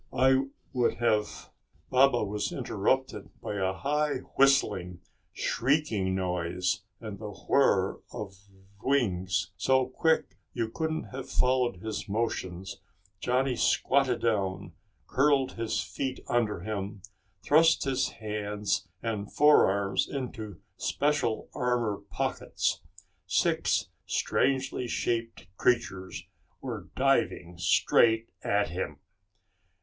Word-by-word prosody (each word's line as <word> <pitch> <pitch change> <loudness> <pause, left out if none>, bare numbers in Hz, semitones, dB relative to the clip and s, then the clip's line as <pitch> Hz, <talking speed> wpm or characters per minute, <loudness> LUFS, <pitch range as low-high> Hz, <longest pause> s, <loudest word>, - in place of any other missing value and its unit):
I 130 +1 +4 0.3
would 125 -2 +2
have 110 -3 0 0.2
" - - -36
Baba 130 -2 +5
was 105 0 -2
interrupted 130 +6 -1
by 105 - -4
a 95 -1 +1
high 145 +9 -1
whistling, 95 -10 +3 0.3
shrieking 115 -9 0
noise, 90 +2 -1 0.2
and 105 -4 -7
the 105 -1 -6
whir 105 - +2
of 100 -2 -6 0.5
wings. 95 - 0
So 130 -1 +3
quick 160 +5 0 0.2
you 115 -2 -1
couldn't 160 +5 -2
have 130 0 -6
followed 125 -7 +1
his 110 -1 -4
motions, 95 -4 -3 0.4
Johnny 125 +3 +1
squatted 130 +1 +2
down, 95 -6 -1 0.3
curled 135 -1 +2
his 115 -1 -2
feet 130 -2 -4
under 110 -7 0
him, 100 -1 -5 0.4
thrust 165 +2 +5
his 130 -1 0
hands 105 -2 -3 0.2
and 105 -3 -3
forearms 100 -10 +4
into 115 -8 -5 0.2
special 145 -6 0
armor 120 -4 0
pockets. - - -1 0.5
Six - - +1 0.2
strangely 130 -2 0
shaped 115 -2 -2
creatures 95 -6 0 0.4
were - - -6
diving 85 0 +1
straight 115 +5 +3
at 100 -2 +1
him. 90 +3 -4
115 Hz, 105 wpm, -29 LUFS, 100-130 Hz, 0.5 s, Baba